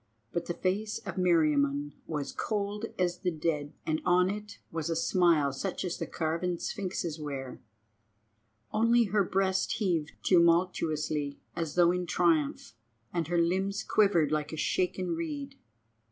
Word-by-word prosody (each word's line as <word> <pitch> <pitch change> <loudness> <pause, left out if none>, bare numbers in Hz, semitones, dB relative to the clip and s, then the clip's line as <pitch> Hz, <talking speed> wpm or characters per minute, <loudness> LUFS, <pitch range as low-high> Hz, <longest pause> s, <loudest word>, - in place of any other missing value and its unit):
But 170 0 -2
the 175 - -2
face 205 +5 -1
of - - -5
Meriamun 145 -5 +2 0.2
was 150 -3 -3
cold 210 +1 -2
as 175 -1 0
the 185 - 0
dead, 155 -3 -2
and 155 0 0
on 180 +1 +4
it 210 0 -7
was 160 0 -3
a 165 - 0
smile 165 -4 +3
such 190 +7 -3
as 180 - -3
the - - -3
carven 170 +2 -1
sphinxes 180 -4 -3
wear. 135 -4 -6 1.1
Only 230 +2 +4
her 205 -1 +2
breast 190 0 +1
heaved 175 -8 0
tumultuously 165 -4 +2 0.2
as 165 -3 -3
though 175 -1 +5
in 180 0 -2
triumph, 165 -5 +1 0.4
and 170 -3 -1
her 175 +1 0
limbs 190 +4 +1
quivered 175 -8 +3
like 150 -1 -1
a 160 - -5
shaken 185 +3 0
reed. 290 -4 -5
175 Hz, 145 wpm, -30 LUFS, 155-195 Hz, 1.1 s, though